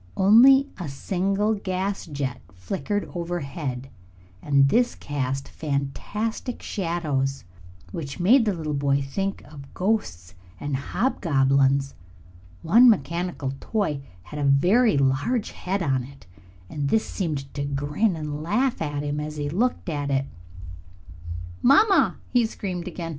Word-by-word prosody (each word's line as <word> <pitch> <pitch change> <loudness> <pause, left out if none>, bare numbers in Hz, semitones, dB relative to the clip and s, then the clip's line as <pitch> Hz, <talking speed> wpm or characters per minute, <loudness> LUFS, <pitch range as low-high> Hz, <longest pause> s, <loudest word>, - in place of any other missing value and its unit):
Only 255 +8 +7
a 170 -5 -4
single 195 +8 0
gas 195 -1 -3
jet 140 -5 -4
flickered 140 - -3
overhead, 145 -7 -4 0.5
and 140 -1 +4
this 245 - +2
cast 135 -1 -3
fantastic 160 - -3
shadows 150 -7 -2 0.5
which 140 - -6
made 225 +7 +5
the 210 - +1
little 155 -3 -3
boy 140 0 +1
think 195 +8 -3
of 140 -3 -12
ghosts 95 - -1 0.3
and 145 -1 -2
hobgoblins. 140 - +1 0.7
One 235 +9 +7
mechanical 160 - 0
toy 195 -11 -1 0.2
had 150 - -8
a - - -1
very 180 - +4
large 140 - +1
head 190 +1 -3
on 135 -4 +1
it, 140 +1 -15 0.4
and 140 +7 -3
this 220 - +2
seemed 150 -7 -4
to 140 - -3
grin 145 +8 0
and 150 -1 -5
laugh 230 +10 0
at 145 -2 -2
him 145 0 -2
as 150 0 -5
he 145 -1 -2
looked 235 +7 0
at 145 -4 -2
it. 135 -1 +1 1.4
"Mamma!" 385 - +5 0.2
he 240 -2 +3
screamed 185 -5 -5
again. 170 -1 -5
155 Hz, 130 wpm, -24 LUFS, 140-200 Hz, 1.4 s, Only